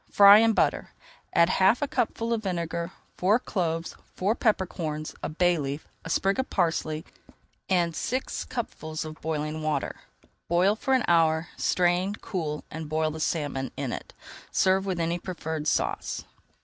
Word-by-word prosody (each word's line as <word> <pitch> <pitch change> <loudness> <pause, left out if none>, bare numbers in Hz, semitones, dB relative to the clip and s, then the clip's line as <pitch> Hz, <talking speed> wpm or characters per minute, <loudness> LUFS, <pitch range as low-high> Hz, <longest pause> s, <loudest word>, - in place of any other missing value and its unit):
Fry 200 +1 +9
in 225 0 +4
butter, - - 0 0.4
add 170 - +5
half 190 +5 +4
a - - 0
cupful 230 -2 -1
of 225 - -1
vinegar, 170 -3 -2 0.3
four 200 +5 +4
cloves, 170 -8 -2 0.2
four 195 +4 +1
pepper 215 -5 +2
corns, 155 -4 -4
a - - -3
bay 175 +1 +2
leaf, 140 +1 -4 0.2
a - - -7
sprig 195 +7 +1
of 260 - -1
parsley, 165 -3 0 0.6
and 175 -3 +2
six 255 +9 -2
cupfuls 160 -10 -5
of 155 0 -9
boiling 155 0 -2
water. 155 -1 -2 0.5
Boil 180 +4 +3
for 265 +4 +1
an 255 - +2
hour, 165 -1 +3
strain, 180 +3 +1
cool, 160 -8 -4
and 160 -1 -6
boil 155 0 +1
the 160 - -7
salmon 145 -5 -1
in - - -2
it. - - -7 0.4
Serve 190 +1 +2
with 185 -3 -1
any 170 +1 0
preferred 160 -4 -4
sauce. - - -1
170 Hz, 160 wpm, -27 LUFS, 155-195 Hz, 0.6 s, Fry